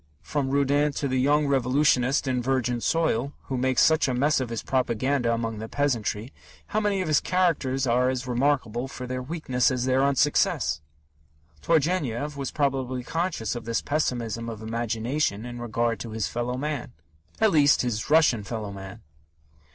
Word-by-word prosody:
From 140 -3 -2
Rudin 140 +1 +2
to 140 - -2
the 130 -1 0
young 145 +3 +3
revolutionist 135 0 +2
in 125 -1 0
Virgin 125 -2 0
Soil, 145 -4 0
who 135 - -4
makes 130 -1 +2
such 160 -2 +4
a 130 - 0
mess 145 +4 +2
of 130 -3 -3
his 115 -1 -4
propaganda 130 0 0
among 115 -2 -2
the 110 +1 -6
peasantry, 120 -4 -1 0.4
how 215 - +1
many 205 -3 0
of - - -5
his 155 -2 +4
characters 160 -8 +1
are 125 +1 +2
as 130 -1 -2
remarkable 125 -1 0
for 130 -1 -7
their 130 0 -4
weakness 130 -3 0
as 125 -1 -1
their 130 +1 +2
unsuccess! 140 - +2 0.8
Turgenev 150 -4 0
was 140 -2 -3
probably 130 -3 -1
conscious 165 - -2
of 120 -2 -6
this 115 0 -1
pessimism 115 -6 -1
of 110 -1 -7
imagination 115 +1 -1
in 120 0 -7
regard 115 0 -1
to 115 - -6
his 110 -2 -1
fellow 120 +1 -3
man 145 -3 -4 0.5
at 220 -2 +4
least, 145 -4 +4
his 115 -3 -2
Russian 150 -8 +4
fellow 105 -1 -5
man. 95 -1 -9
130 Hz, 165 wpm, -26 LUFS, 120-145 Hz, 0.8 s, such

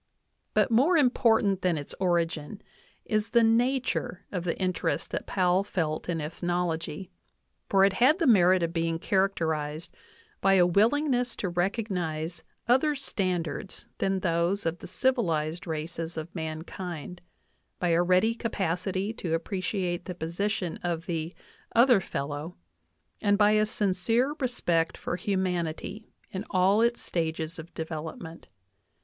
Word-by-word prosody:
But - - +3
more 280 +10 +4
important 225 - +3
than 180 -3 +1
its 145 - -6
origin 170 0 -1 0.4
is 215 0 0
the 235 -1 +4
nature 240 -3 +1
of 180 -3 -3
the 170 - -1
interest 185 -1 -1
that - - -3
Powell 185 0 +2
felt 160 -5 -2
in 165 -2 0
ethnology; 175 +1 -3 0.6
for 195 -1 +5
it 200 - +2
had 255 - +4
the 340 - 0
merit 185 - +5
of 165 0 -1
being 165 -1 0
characterized 165 -5 -1 0.5
by 195 0 +5
a 180 -2 +6
willingness 245 - +2
to 185 - -2
recognize 175 -4 -2 0.2
other 265 +5 +3
standards 185 - -3
than 195 -1 0
those 170 +3 0
of 165 +1 -1
the - - -9
civilized 175 - 0
races 160 +1 -4
of 160 +2 -6
mankind, 165 +1 -6 0.6
by 175 - 0
a 170 +1 +4
ready 185 +6 +3
capacity 190 -2 -2
to 170 -7 -2
appreciate 180 0 -2
the 180 - -5
position 180 +2 -2
of 170 -1 -2
the 165 0 -3 0.4
"other 240 -2 +6
fellow," 145 +2 -4 0.7
and 205 -1 +3
by 210 0 +5
a 215 0 +3
sincere 220 +7 +1
respect 175 - 0
for - - -3
humanity 185 +1 -2 0.2
in 190 +1 -4
all 190 +3 +3
its 235 +1 +1
stages 160 -1 -2
of 160 +2 -9
development. 160 +1 -6
180 Hz, 135 wpm, -28 LUFS, 165-210 Hz, 0.7 s, a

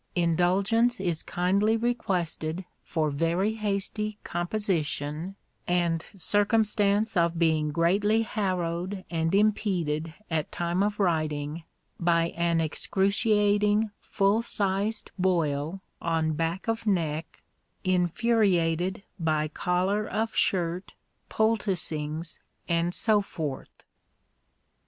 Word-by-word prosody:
Indulgence 190 +7 +2
is 175 -4 -1
kindly 200 +5 +1
requested 185 -7 -1 0.2
for 155 -3 -1
very 170 +8 +1
hasty 210 0 -2
composition, 175 -3 -2 0.3
and 170 -2 +1
circumstance 210 +2 +2
of 170 -1 +2
being 160 -2 +2
greatly 200 +8 +2
harrowed 185 -3 -2
and 165 +2 +1
impeded 175 -7 +1
at 160 -2 -2
time 175 +2 -1
of 205 +1 0
writing 155 -3 -1 0.3
by 170 -1 +2
an 170 -1 0
excruciating 205 +5 +2
full 200 +3 +1
sized 205 -1 -1
boil 165 -1 0 0.2
on 160 -1 0
back 165 +6 -2
of 225 0 -1
neck, 165 -5 -1 0.4
infuriated 185 -2 +1 0.2
by 155 -2 +1
collar 185 +6 0
of 220 0 -2
shirt, 180 0 0 0.3
poulticings, 170 -8 -1 0.3
and 170 +1 0
so 215 -2 +3
forth. 155 -8 -6
180 Hz, 95 wpm, -27 LUFS, 165-205 Hz, 0.4 s, so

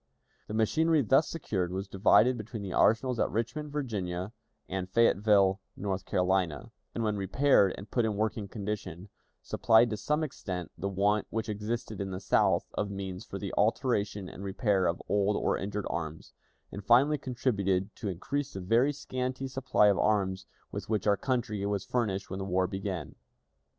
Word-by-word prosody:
The 105 - -5
machinery 155 +7 +3
thus 135 +7 +4
secured 95 - -2
was 95 +2 -3
divided 105 +6 +4
between 110 -1 -6
the 95 - -5
arsenals 120 +2 +3
at - - +2
Richmond, 145 +7 -3
Virginia, 100 -9 -3 0.4
and 95 0 -4
Fayetteville, 100 -3 +4 0.2
North 95 -2 -3
Carolina, 90 -4 0 0.2
and, 115 - -1
when 105 -1 0
repaired 100 0 +3
and 100 - -10
put 120 - +2
in 110 -2 0
working 110 0 -1
condition, 100 -3 -5 0.3
supplied 115 +1 +4
to 110 - -2
some 150 +9 0
extent 90 - -5
the 95 +4 -3
want 100 +2 +1
which 115 0 -3
existed 110 +1 -3
in 100 - -3
the 95 -1 -4
South 95 - +2
of 105 - -2
means 95 -2 -5
for 100 - -6
the 100 0 -5
alteration 105 -3 +1
and 95 - -9
repair 100 -1 +1
of 85 - -1
old 105 0 +2
or - - +1
injured 100 +1 -3
arms, 80 -1 -5 0.4
and 100 - -7
finally 135 +7 +4
contributed 100 -7 -1
to 105 - -3
increase 140 +10 -3
the - - -5
very 115 +9 +3
scanty 130 -2 -4
supply 130 -4 +2
of 100 -2 +4
arms 95 -3 +1 0.2
with - - -6
which 110 -2 0
our 105 -1 +4
country 110 -4 -2
was 100 -2 -2
furnished 105 -6 -1
when 95 - -5
the - - -3
war 95 -1 +1
began. 95 -4 -4
105 Hz, 170 wpm, -30 LUFS, 95-120 Hz, 0.4 s, thus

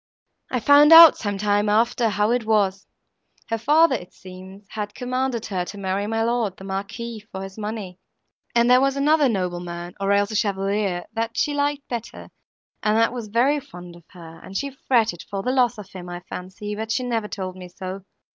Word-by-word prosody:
I 250 - -1
found 285 +5 +6
out, 330 -1 +11
some 205 -2 -3
time 205 +1 +1
after, 230 +2 +2
how 210 +2 +1
it 245 -1 +1
was. 205 -3 +1 0.6
Her 225 0 -1
father, 300 +6 +4
it 180 -8 -5
seems, 190 +2 -12
had 210 -1 -5
commanded 255 -1 -2
her 185 -4 -2
to 205 - -9
marry 195 +1 -2
my 225 +1 0
lord, 230 -5 -1
the - - -12
Marquis, 200 +4 -5
for 190 0 -6
his 195 0 -9
money, 210 -4 -6 0.6
and 235 0 +4
there 250 +1 +6
was 275 0 +1
another 295 0 +3
nobleman, 175 -3 -4
or 195 0 0
else 200 +1 +2
a - - -4
chevalier, 195 -3 -1
that 230 0 -3
she 295 - +1
liked 285 0 -1
better 235 -2 -7 0.5
and 215 0 +2
that 230 +1 +2
was 235 -3 -5
very 250 +8 +2
fond 180 -11 -12
of 170 -1 -17
her, 165 -3 -13
and 195 - -6
she 280 0 -3
fretted 230 -8 0
for 195 -1 -4
the 250 - 0
loss 250 -2 +2
of 205 -2 -10
him, 180 -1 -9
I 175 0 -6
fancy, 190 +3 -7
but 220 +1 -4
she 255 - 0
never 230 -4 -2
told 185 -3 -5
me 180 -1 -10
so. 185 +2 -7
210 Hz, 200 wpm, -23 LUFS, 190-245 Hz, 0.6 s, out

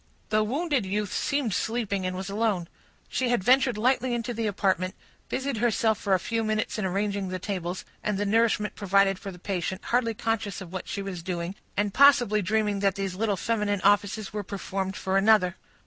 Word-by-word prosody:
The 215 0 +3
wounded 280 +2 0
youth 200 +1 -2
seemed 280 -7 0
sleeping, 200 -3 -1
and 185 - -3
was 190 +1 -4
alone. 200 -4 0 0.4
She 255 -2 -1
had 240 -6 +1
ventured 255 0 +4
lightly 255 +2 +2
into 240 +1 -3
the 225 -1 -1
apartment, 190 -2 0
and - - -31
busied 265 -2 -2
herself 220 -1 +2
for 195 -2 +2
a - - +1
few 225 +5 -1
minutes 215 0 -1
in 205 - -1
arranging 200 +1 -1
the 185 - -3
tables, 185 -2 -4 0.2
and 210 -2 0
the 205 - 0
nourishment 215 0 +2
provided 195 -1 +2
for 200 - -6
the 180 - -9
patient, 185 0 -3
hardly 235 -2 +1
conscious 220 -2 -2
of 185 -2 -10
what 185 - -5
she 200 - -3
was 190 -3 -5
doing, 170 0 -3 0.2
and 205 -1 +1
possibly 245 -7 +5
dreaming 210 0 0
that 195 -1 +2
these 195 -2 -2
little 205 +1 0
feminine 210 -3 0
offices 205 +1 +2
were 210 - -2
performed 195 -1 -4
for 190 0 0
another. 195 -3 +4
205 Hz, 195 wpm, -27 LUFS, 190-225 Hz, 0.4 s, possibly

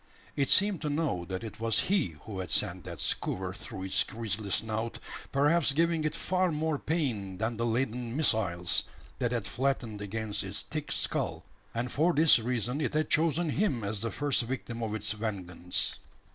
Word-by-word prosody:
It 140 -2 +1
seemed 200 -2 +5
to 150 - -1
know 145 - 0
that 95 +3 -4
it 110 -2 -7
was 115 -1 +2
he 180 - +1
who 105 -4 -6
had 90 -2 -4
sent - - 0
that - - -7
skewer 95 0 -1
through 95 -1 -7
its 95 - +2
gristly 110 -3 -4
snout 110 +3 -1 0.3
perhaps 145 +1 +4
giving 165 +1 +2
it 155 - 0
far 185 -1 +1
more 155 -1 0
pain 115 - -1
than 110 +3 -1
the 115 +2 0
leaden 120 +1 -1
missiles 95 - +3 0.4
that 120 -2 +1
had 120 -5 -1
flattened 120 -4 -1
against 105 0 -3
its 95 +1 -4
thick 155 -2 -5
skull; - - -1 0.3
and 120 +1 -1
for 165 +5 +3
this 155 -3 +6
reason 125 +4 -1
it 150 - -1
had 155 0 +1
chosen 165 0 +3
him 145 - +1
as 100 0 -2
the 115 - -1
first 145 0 +1
victim 120 -1 -4
of 110 -1 -2
its 105 0 0
vengeance. 95 -5 -2
115 Hz, 180 wpm, -30 LUFS, 105-150 Hz, 0.4 s, this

